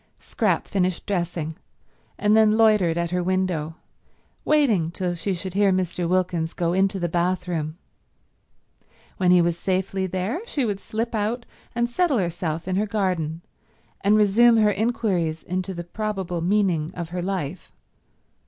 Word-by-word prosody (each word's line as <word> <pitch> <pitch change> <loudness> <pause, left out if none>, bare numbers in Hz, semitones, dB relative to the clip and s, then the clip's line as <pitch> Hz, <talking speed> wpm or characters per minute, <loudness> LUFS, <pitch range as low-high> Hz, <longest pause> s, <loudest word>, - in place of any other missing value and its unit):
Scrap - - -1
finished 185 -3 -1
dressing, 170 -5 -2 0.6
and 210 +1 +3
then 220 -1 +5
loitered 210 -7 +4
at 170 0 -1
her 180 0 0
window, 175 -4 -1 0.7
waiting 230 - +3
till 180 0 -2
she 185 +3 -2
should 180 +1 -6
hear 200 0 +3
Mr. 180 -2 -1
Wilkins 175 -3 0
go 170 -1 0
into 190 +1 +1
the 175 - 0
bathroom. 170 -2 -1 1.4
When 180 - +2
he 180 -1 +6
was 170 0 0
safely 190 +1 -1
there 190 - -2
she 280 - -1
would 205 -3 -2
slip 225 +4 -3
out 225 +3 -1 0.3
and 235 0 +1
settle 295 +2 +1
herself 170 -3 -2
in 185 0 0
her 210 +2 +1
garden 180 -6 -1 0.6
and 205 +2 +4
resume 225 +3 +5
her 210 -1 +4
inquiries 195 -7 -1
into 185 +1 -3
the 170 - -5
probable 190 -2 -3
meaning 175 -4 +1
of 170 -2 -5
her 180 +1 -3
life. 180 -3 -4
185 Hz, 150 wpm, -24 LUFS, 170-210 Hz, 1.4 s, he